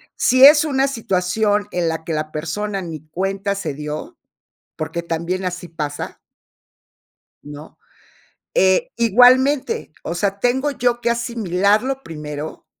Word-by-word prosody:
Si 255 +1 +3
es 295 +2 +9
una 270 -2 +1
situación, 205 -2 0
en 175 -2 0
la 160 0 -4
que 160 - -4
la 155 0 -3
persona 195 +6 -3
ni 160 -3 -8
cuenta 195 +3 -2
se 160 -8 -4
dio, 150 +1 -6 0.6
porque 170 +2 -4
también 170 +3 -3
así 180 -1 -5
pasa 150 -3 -5 1.2
¿no? 145 +1 -11 0.8
Eh, 190 0 +3
igualmente, 255 - +4
o 170 - -4
sea, 200 +2 -1
tengo 265 +4 +1
yo 245 -2 0
que 235 - +1
asimilarlo 235 +2 0
primero 150 - -7
195 Hz, 125 wpm, -20 LUFS, 165-240 Hz, 1.2 s, es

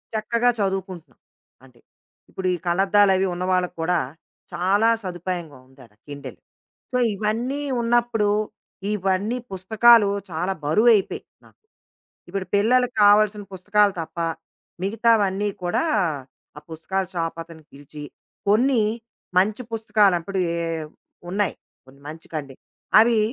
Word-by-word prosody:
చక్కగా 235 +3 +1
చదువుకుంటున్నాం. 190 - -4 0.4
అంటే 125 -3 -20 0.5
ఇప్పుడు 190 - -4
ఈ - - -5
కళ్ళద్దాలవి 195 +1 +3
ఉన్నవాళ్ళక్కూడా, 180 -1 0 0.5
చాలా 200 +5 +2
సదుపాయంగా 175 -5 -5
ఉందాడ 130 -4 -18 0.2
కిండెల్. 145 -1 -9 0.6
సో, - - 0 0.2
ఇవన్నీ 235 +8 -2 0.2
ఉన్నప్పుడు 235 -2 +1 0.7
ఇవన్నీ 195 +4 -1
పుస్తకాలు 220 +3 +5 0.2
చాలా 180 +4 -2
బరువైపోయాయి 210 +6 +3 0.2
నాకు. - - -23 0.7
ఇప్పుడు 195 -1 -4
పిల్లలకి 245 +4 +3
కావాల్సిన 205 0 +4
పుస్తకాలు 205 +2 +2
తప్ప 165 +1 -8 0.6
మిగతావన్నీ 205 -1 +2
కూడా, 175 - 0 0.7
ఆ - - -8
పుస్తకాల 190 +4 -3
షాప్ 165 -1 -3
అతని 165 -1 -14
పిలిచి 145 +1 -11 0.5
కొన్ని 240 +3 +3 0.6
మంచి 210 +6 +1
పుస్తకాలప్పడవి 200 -4 +1
ఎ - - -2 0.7
ఉన్నాయి. 200 -1 0 0.3
కొన్ని 135 +1 -19
మంచి 160 +1 -10
కండిన్ 140 -3 -6 0.4
అవి 230 0 +5
195 Hz, 105 wpm, -23 LUFS, 175-215 Hz, 0.7 s, పుస్తకాలు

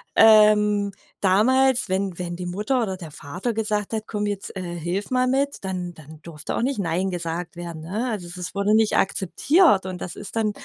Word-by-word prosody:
ähm, 210 -2 +6 0.3
damals, 255 +7 +3
wenn 190 -1 -2
wenn 175 -1 -4
die 180 +1 -6
Mutter 210 +8 -1
oder 190 -4 -3
der 165 -4 -9
Vater 180 +12 -4
gesagt 210 -1 -2
hat: 220 -1 -2
„Komm, 210 -1 -3
jetzt, 205 -1 -4
äh, - - -3
hilf 175 +2 -3
mal 255 0 +2
mit“, 275 0 0
dann 180 -2 -4
dann 155 0 -14
durfte 155 -3 -6
auch - - 0
nicht 265 -2 -1
nein 185 +1 -1
gesagt 170 0 -4
werden, 170 -2 -7
ne? 215 +9 -2
Also 200 -6 -4
es 175 - -8
es 180 0 -6
wurde 200 +1 +2
nicht 220 -1 +3
akzeptiert 200 - +3
und 185 -1 -6
das 175 - -6
ist - - -8
dann 220 -2 +1
195 Hz, 205 wpm, -23 LUFS, 175-220 Hz, 0.3 s, ähm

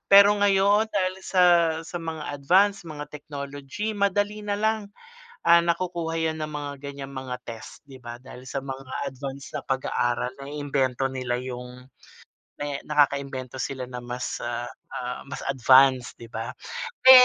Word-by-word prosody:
Pero 200 +1 +9
ngayon 205 +2 +4
dahil 185 -2 +1
sa, 185 -1 +3 0.4
sa 175 - -4
mga 160 -3 -4
advanced 190 +8 +4
mga 150 -3 -7
technology 145 +7 -5
madali 205 +1 +1
na 205 -1 -1
lang, 215 -1 +1 0.6
ah, 170 0 +8
nakukuha 170 -1 -1
yan 160 -1 0
ng 155 - -3
mga 145 -1 -4
ganyang 140 -1 -7
mga 130 -1 -4
test 115 -2 -8
'di 135 -2 -12
ba. 120 0 -6
Dahil 125 0 -12
sa - - -2
mga 135 -1 -5
advanced 135 +1 -7
na - - -1
pag-aaral, 125 -2 0
naiimbento 140 -2 -1
nila 125 -2 -1
yung 125 0 -7 0.8
me 145 -1 -2
nakakaimbento 140 -3 +1
sila 130 -1 -3
na 125 -1 -7
mas, 125 +1 -3
ah, 120 0 -3 0.2
ah, 125 0 -4
mas 140 - -7
advanced 130 -1 +5
'di 115 - -9
ba. 115 +3 -4 0.5
Pe 260 - +11
140 Hz, 150 wpm, -26 LUFS, 130-175 Hz, 0.8 s, Pe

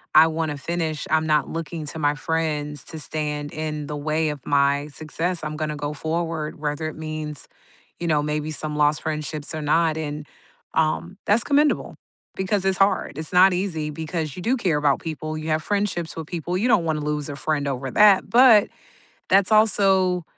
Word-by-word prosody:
I 160 +1 +9
wanna 160 -2 -2
finish. 160 0 -3
I'm 160 0 +2
not 150 -1 +2
looking 165 -1 -5
to 160 +2 -5
my 145 0 +1
friends 150 -3 -2
to 160 - -6
stand 150 -1 -3
in 155 -1 -4
the 150 0 -4
way 155 +1 0
of 150 - -4
my 140 0 +2
success, 165 +4 -3
I'm 155 0 -4
gonna 155 -1 -2
go 145 +1 -3
forward, 160 0 -3
whether 150 +1 -2
it 155 - -6
means, 155 -2 -5 0.5
you 175 - -2
know, 150 -2 +2
maybe 150 +1 -2
some 150 0 -3
lost 150 0 +2
friendships 155 -1 -4
or 155 - -4
not." 160 +1 +2
And, 150 -1 -5 0.5
um, 160 +3 0
that's 215 +3 +4
commendable 290 +1 +1 0.4
because 190 +1 0
it's 190 - +2
hard; 195 -7 +1
it's 160 - -3
not 185 +1 +6
easy 175 -5 -2
because 160 0 -4
you 180 - -6
do 235 +6 +2
care 180 - +1
about 145 -2 +2
people, 155 -1 -5
you 155 +1 -6
have 155 0 +1
friendships 200 -4 -1
with 160 - -5
people, 175 +2 -3
you 225 +6 +1
don't 190 -8 +4
wanna 155 -2 -1
lose 150 0 -2
a 140 - -6
friend 150 -1 -1
over 135 0 -3
that, 210 -2 +5
but 235 -4 +7 0.6
that's 195 +2 +4
also, 195 -4 +4
155 Hz, 190 wpm, -23 LUFS, 150-175 Hz, 0.6 s, I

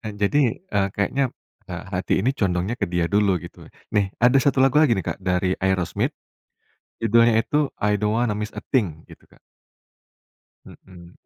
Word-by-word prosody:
Nah 110 -2 -6
jadi, 115 +4 +2
eee, 100 - 0
kayaknya, 130 +6 0 0.4
eee, 90 -1 -5
hati 90 - 0
ini 120 +8 +1
condongnya 95 -1 -1
ke - - +1
dia 90 -1 0
dulu 100 0 +2
gitu. - - -12 0.3
Nih, 100 -2 +2
ada 125 +3 +5
1 140 - +1
lagu 140 +3 +4
lagi 120 -8 +3
nih 95 - -3
Kak, - - -3
dari 90 0 0
Aerosmith. 95 -3 0 0.9
Judulnya 115 0 +4
itu, 150 0 0
I 105 0 0
Don't 105 +1 +1
Want 120 -2 +1
to - - -6
Miss 105 0 -4
a - - -7
Thing 90 - 0
gitu - - -17
Kak. - - -23 1.3
Hmm. 90 -2 -15
105 Hz, 175 wpm, -23 LUFS, 95-120 Hz, 1.3 s, ada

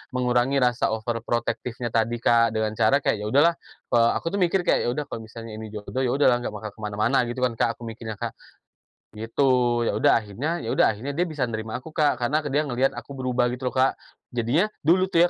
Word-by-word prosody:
mengurangi 125 +2 +1
rasa 120 -2 +1
overprotective-nya 120 +1 -3
tadi, 115 +1 +1
Kak, 115 -1 +4
dengan 110 -1 0
cara 110 +6 +2
kayak, 105 - +1
ya 105 - -4
udahlah, 145 +9 +5 0.4
eee, 115 -1 +5
aku 165 - -2
tuh 200 - -1
mikir 180 +1 +2
kayak, 170 - +2
"Ya - - +2
udah, 150 - -2
kalau - - -4
misalnya 115 -1 -9
ini 110 - -6
jodoh 105 +5 -5
ya 130 - +1
udahlah 125 -4 +4
nggak 110 -3 -5
bakal 105 0 -6
ke 110 - -23
mana-mana." 105 +4 +1
Gitu 120 - -4
kan, 125 - +3
Kak, 115 -1 +1
aku 120 - -13
mikirnya, 115 -1 -6
Kak. - - -4 0.8
Gitu, 115 +5 0 0.4
ya - - 0
udah 110 - +4
akhirnya 115 +8 -3
ya - - -1
udah 105 - +3
akhirnya 140 +6 -5
dia 175 +4 +1
bisa 145 -5 -1
nerima 110 0 -4
aku, 155 +5 -11
Kak. 150 -4 +2
Karena 125 +6 0
ke 145 - -4
dia 150 +3 +1
ngeliat 130 0 0
aku 140 - -8
berubah 125 -2 0
gitu 125 0 -2
loh, - - -15
Kak. 130 +1 +2 0.3
Jadinya, 125 - +2 0.2
dulu 180 +5 +4
tuh 170 +1 +5
120 Hz, 225 wpm, -24 LUFS, 110-140 Hz, 0.8 s, udahlah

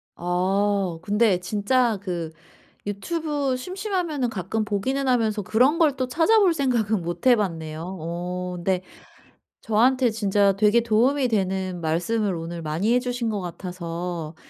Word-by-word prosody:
아. 185 +1 0
근데 205 -1 +2
진짜 215 +4 +1
그 175 -5 -4 0.5
유튜브 285 - -2
심심하면은 360 - -2
가끔 215 +1 -2
보기는 260 +7 -1
하면서 220 -4 +1
그런 250 - +3
걸 305 -5 +4
또 255 -1 -1
찾아볼 360 - +4
생각은 235 - 0
못 175 +6 -3
해봤네요. 175 -6 0
어. 180 +2 -4
근데 180 +1 -1 0.8
저한테 245 +2 +3
진짜 200 -2 +2
되게 210 +3 +4
도움이 250 +5 +2
되는 190 -4 -1
말씀을 180 +5 0
오늘 165 +1 -6
많이 165 +9 0
해 250 - +4
주신 245 -2 -2
것 210 -2 -2
같아서 170 -2 -5
205 Hz, 275 characters per minute, -24 LUFS, 180-250 Hz, 0.8 s, 걸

